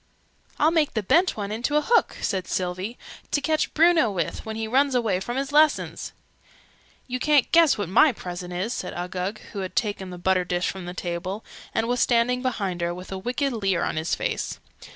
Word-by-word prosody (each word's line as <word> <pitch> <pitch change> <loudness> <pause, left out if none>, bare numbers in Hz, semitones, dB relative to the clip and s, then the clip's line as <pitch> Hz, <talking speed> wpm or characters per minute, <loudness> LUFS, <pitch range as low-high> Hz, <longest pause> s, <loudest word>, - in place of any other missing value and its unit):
"I'll 310 +2 +4
make 315 -6 +1
the 215 - 0
bent 345 - +3
one 205 -1 -3
into 240 +7 -1
a - - +3
hook!" 470 0 +2
said 190 -2 -1
Sylvie. 185 +5 -3 0.3
"To - - +1
catch 310 +1 0
Bruno 325 -6 +5
with, 175 -6 -3
when 220 - -4
he 220 0 -3
runs 270 +3 +2
away 220 -7 +1
from 240 +6 -4
his 275 +1 -2
lessons!" 305 +1 +2 0.9
"You 255 0 -3
ca'n't 295 -1 +3
guess 335 -3 +5
what 205 -3 -2
my 270 - +5
present 180 -5 -7
is!" 185 +7 -2
said 180 - -5
Uggug, 180 +3 -3 0.2
who 205 - -4
had 185 -1 -5
taken 205 -4 -1
the 180 - -7
butter 185 +1 +2
dish 180 0 -1
from 190 -2 -8
the 180 +1 -6
table, 185 +4 -4 0.3
and 225 +1 0
was 245 +1 0
standing 245 +1 +2
behind 200 -9 -2
her, 170 0 -1
with 180 +2 -10
a 190 - -3
wicked 255 +6 -1
leer 195 -6 0
on - - -1
his 160 +2 0
face. - - -3
215 Hz, 205 wpm, -25 LUFS, 185-260 Hz, 0.9 s, Bruno